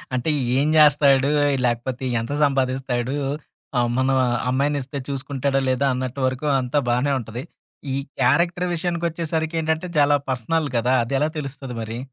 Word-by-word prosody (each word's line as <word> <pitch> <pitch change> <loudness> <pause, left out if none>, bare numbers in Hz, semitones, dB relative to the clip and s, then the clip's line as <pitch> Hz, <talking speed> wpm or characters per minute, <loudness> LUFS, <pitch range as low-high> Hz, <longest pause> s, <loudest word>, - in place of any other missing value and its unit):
అంటే 130 +5 0 0.3
ఏం 140 +2 +2
జేస్తాడు? 145 -2 +5 0.3
లేకపోతే 120 +2 -1 0.2
ఎంత 115 +5 -5
సంపాదిస్తాడు? 130 -2 0 0.6
మా 125 - +3
అమ్మనా 130 +3 +1 0.4
అమ్మాయినిస్తే 140 +1 -1
చూసుకుంటాడా 135 0 -1
లేదా 130 +2 +1
అన్నట్టు 130 +1 -4
వరకు 130 +3 -2
అంతా 125 +3 -1
బానే 125 +4 +1
ఉంటది. 115 +2 -7 0.5
ఈ - - 0 0.2
క్యారెక్టర్ 170 +7 +2
విషయానికొచ్చేసరికేంటంటే, 165 -1 -1
చాలా 145 0 +5
పర్సనల్ 140 +5 -1
గదా! 125 +2 +2
అదెలా 135 +5 0
తెలుస్తది 135 -3 -6
మరి? 115 +1 -5
135 Hz, 125 wpm, -22 LUFS, 125-150 Hz, 0.6 s, జేస్తాడు